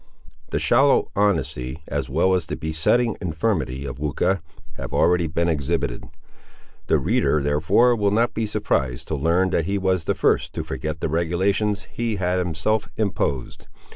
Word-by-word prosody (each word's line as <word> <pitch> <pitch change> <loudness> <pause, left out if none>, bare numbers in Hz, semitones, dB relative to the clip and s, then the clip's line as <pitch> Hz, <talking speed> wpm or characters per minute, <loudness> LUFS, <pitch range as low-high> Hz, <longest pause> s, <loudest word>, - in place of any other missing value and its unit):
The - - -1
shallow 125 - +3
honesty, 80 -8 -1
as - - -3
well 85 +7 +2
as 90 -3 0
the - - -3
besetting 80 +9 +1
infirmity 80 - -1
of 65 -1 -6
Weucha, 75 +5 0 0.3
have - - -7
already 85 -1 +3
been 85 +2 0
exhibited. 70 -6 -1 0.8
The - - +4
reader, 75 - +1
therefore, 75 - +3
will 105 -3 +1
not 115 +4 +1
be 110 -1 -1
surprised 80 -12 -1
to 80 - 0
learn 85 +6 +1
that 80 - +1
he 100 +2 -1
was 95 -3 0
the - - 0
first - - +1
to - - -3
forget 80 +1 -5
the - - 0
regulations 95 +5 0
he 115 +3 -3
had 90 -1 0
himself 90 +5 -1
imposed. 70 - -2
90 Hz, 160 wpm, -23 LUFS, 75-100 Hz, 0.8 s, The